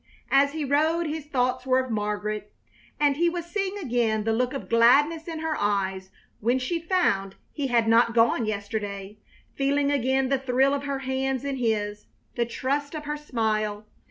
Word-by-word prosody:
As 280 +1 +4
he 310 -2 -2
rode 315 +5 +2
his 305 -1 -4
thoughts 255 -2 0
were 260 -1 +2
of 260 -1 -1
Margaret, 210 0 -3 0.5
and 290 -1 +3
he 340 +2 +3
was 345 -1 -4
seeing 390 +2 -2
again 235 - 0
the 225 +1 +1
look 250 +2 0
of 275 - -6
gladness 290 +8 +4
in 325 -2 -5
her 320 -1 -1
eyes 190 -3 -1 0.3
when 240 +4 +2
she 260 +7 -2
found 200 - +1 0.2
he 285 -3 -2
had 235 -3 +2
not 230 +1 +4
gone 230 0 +3
yesterday; 205 -1 -4 0.3
feeling 280 +1 +1
again 265 -1 +1
the 275 -1 +2
thrill 265 +1 +2
of 285 0 -2
her 280 -1 -2
hands 265 0 -1
in 275 -1 -2
his, 210 -3 -1 0.3
the 235 -1 -1
trust 280 +5 -2
of 300 -1 -6
her 295 0 -2
smile! 215 -7 -2
255 Hz, 180 wpm, -26 LUFS, 220-290 Hz, 0.5 s, As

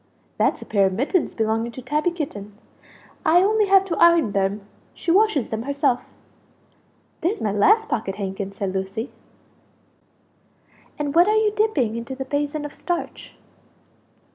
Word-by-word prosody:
"That's - - +1
a - - -14
pair 200 -2 +2
of 190 - -3
mittens 285 - 0
belonging 225 +1 -1
to 255 - -8
Tabby 300 +6 0
Kitten; 210 - -6 0.7
I 350 +3 +5
only 425 +1 +2
have 390 0 +5
to 350 -4 -3
iron 335 -9 +5
them; 200 +1 0 0.3
she 335 - -2
washes 380 - +3
them 220 0 -3
herself." 280 -1 0 1.2
"There's 380 +7 0
my 210 - -1
last 425 - +3
pocket 195 - -2
handkin!" 195 -1 -4
said 195 -1 -4
Lucie. 195 +6 -4 1.9
"And 290 -1 -2
what 345 +3 +5
are 430 +1 +3
you 435 -1 +2
dipping 315 - +1
into 235 +3 -5
the 265 0 -5
basin 290 +2 -2
of 295 - -7
starch?" 350 -1 -5
280 Hz, 150 wpm, -22 LUFS, 215-350 Hz, 1.9 s, I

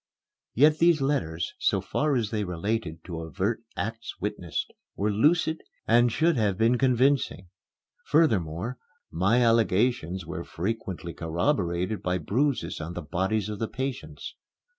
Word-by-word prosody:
Yet 150 +5 +5
these 170 -2 +5
letters, 120 - -1
so - - +2
far 150 -1 0
as 115 -4 0
they 110 -2 0
related 90 -2 -3
to 85 -3 -6
overt 95 +8 -2 0.2
acts 115 +2 -4
witnessed, 90 -7 -3 0.2
were 105 +2 0
lucid 160 +8 +2 0.3
and 120 +1 +5
should 160 +3 +2
have 105 -4 +1
been 115 +3 +3
convincing. 130 -7 +2 0.6
Furthermore, 110 - +1 0.3
my 105 +8 +3
allegations 110 -5 +2
were 85 +1 -5
frequently 90 -3 -4
corroborated 90 - -1
by 90 0 0
bruises 125 - -1
on 80 +3 -5
the 90 - -4
bodies 95 +6 -1
of 105 -1 -5
the 115 - -1
patients. 135 -1 -5
105 Hz, 135 wpm, -27 LUFS, 90-125 Hz, 0.6 s, Yet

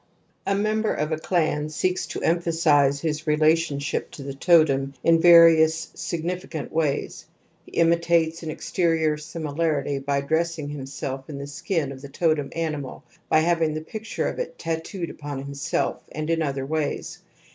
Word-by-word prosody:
A 200 - +2
member 215 +2 +1
of 150 +1 -2
a 155 - -1
clan 155 -3 0
seeks 180 +4 -1
to - - -5
emphasize 160 -5 +3
his 155 -1 -3
relationship 155 -1 +1
to 140 - -8
the 140 0 -5
totem 140 -3 +3
in 165 0 +4
various 165 -2 +6
significant 170 -2 -4
ways; 155 -3 -1 0.4
he - - -16
imitates 170 -1 +2
an 160 - -5
exterior 160 -1 0
similarity 150 -2 -2
by 140 0 -1
dressing 160 0 -1
himself 135 -1 -6
in 145 - -6
the 140 - -5
skin 145 +1 -2
of 130 -1 -9
the 140 - -9
totem 155 -2 0
animal, 155 -5 -4 0.3
by 155 - +5
having 165 -2 +1
the 155 - -3
picture 220 +7 -4
of - - -4
it - - -4
tattooed 165 +2 -4
upon 145 -2 -6
him 140 0 -7
self, 140 +5 -1
and 155 +2 -3
in 165 0 +1
other 140 -3 -2
ways. 155 0 -3
155 Hz, 155 wpm, -24 LUFS, 145-165 Hz, 0.4 s, various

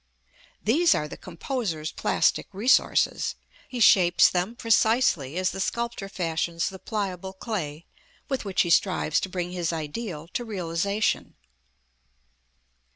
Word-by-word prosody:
These 320 +11 +4
are 150 - -1
the - - -8
composer's 175 - -4
plastic - - +1
resources. 225 +7 +2 0.3
He 250 - -5
shapes 180 -5 +6
them 185 +6 -1
precisely 220 - +2
as 185 0 +1
the 195 - -7
sculptor 235 -1 -2
fashions 170 -1 -1
the 190 - -10
pliable 190 -3 -4
clay 175 -7 -5 0.4
with 270 -3 -2
which 195 -3 +1
he 175 - -2
strives 175 -3 +2
to 190 - -4
bring 180 -1 -3
his 175 -2 -2
ideal 165 +1 -5
to 240 - -3
realization. 200 0 -1
185 Hz, 125 wpm, -26 LUFS, 170-220 Hz, 0.4 s, shapes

